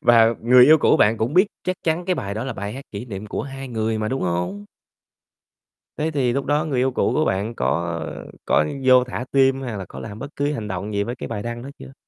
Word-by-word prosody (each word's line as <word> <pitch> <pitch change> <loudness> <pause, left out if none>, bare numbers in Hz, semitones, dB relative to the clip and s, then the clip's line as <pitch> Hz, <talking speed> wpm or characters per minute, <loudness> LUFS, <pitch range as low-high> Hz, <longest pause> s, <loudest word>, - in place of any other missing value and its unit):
Và 115 -1 +5
người 125 +1 +7
yêu 155 +3 +7
cũ - - +4
bạn 110 +2 +4
cũng 120 +8 -1
biết 185 +3 +6 0.2
chắc 185 0 -1
chắn 165 +2 0
cái 185 0 +1
bài 100 -8 -4
đó 110 - -3
là 135 - -3
bài 100 -1 -5
hát 135 +3 -8
kỷ 100 +3 -6
niệm 105 -3 -7
của - - -3
hai 135 -1 -7
người 110 -2 -1
mà, 105 - -1
đúng 135 +3 -2
hông? 90 +3 -2 1.3
Thế 155 +1 -1
thì 130 -5 +1
lúc 140 +1 -1
đó 150 +2 +1
người 135 -5 -1
yêu 130 +1 +2
cũ - - 0
của 155 - +2
bạn 100 +5 -1
có 85 -4 -1 0.5
có 75 - +3 0.2
vô 130 -1 +6
thả 125 0 -5
tim, 135 -1 +3
hay 120 -5 -4
là 95 - -6
có - - -10
làm 105 -1 -8
bất 140 +3 -8
cứ 145 +1 0
hành 110 -6 -4
động 100 +2 -4
gì 100 0 +1
với 120 +3 -4
cái - - -6
bài 105 -3 -4
đăng 120 0 -5
đó 135 - -7
chưa? 135 - -11
120 Hz, 260 wpm, -22 LUFS, 105-135 Hz, 1.3 s, người